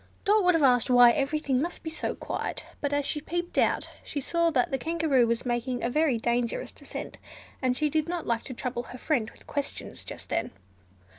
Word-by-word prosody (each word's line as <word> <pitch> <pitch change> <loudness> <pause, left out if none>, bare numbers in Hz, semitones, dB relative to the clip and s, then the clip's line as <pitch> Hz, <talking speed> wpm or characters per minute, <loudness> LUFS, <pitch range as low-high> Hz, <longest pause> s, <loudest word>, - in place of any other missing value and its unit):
Dot 420 0 +4
would 360 -1 +5
have 320 - +2
asked 250 -2 +4
why 245 -1 +8
everything 275 0 0
must 345 +3 -4
be 320 - -4
so - - -3
quiet; - - -4 0.2
but 285 - -1
as 285 -1 +1
she 300 - -1
peeped 345 +3 -3
out, - - +2 0.2
she 290 - -4
saw 335 +4 +1
that 260 -6 +1
the 270 - 0
Kangaroo 315 -6 +2
was 235 +2 0
making 245 +1 -1
a 235 - 0
very 300 -3 +2
dangerous 235 +1 -1
descent, - - -8 0.4
and 255 -1 +1
she 305 - +2
did 310 +2 0
not 350 -1 -2
like 230 -1 0
to 260 - -6
trouble 245 0 -3
her 250 - -8
friend 250 -5 0
with - - -19
questions 285 -1 -4
just - - -8
then. - - 0
275 Hz, 210 wpm, -28 LUFS, 245-315 Hz, 0.4 s, why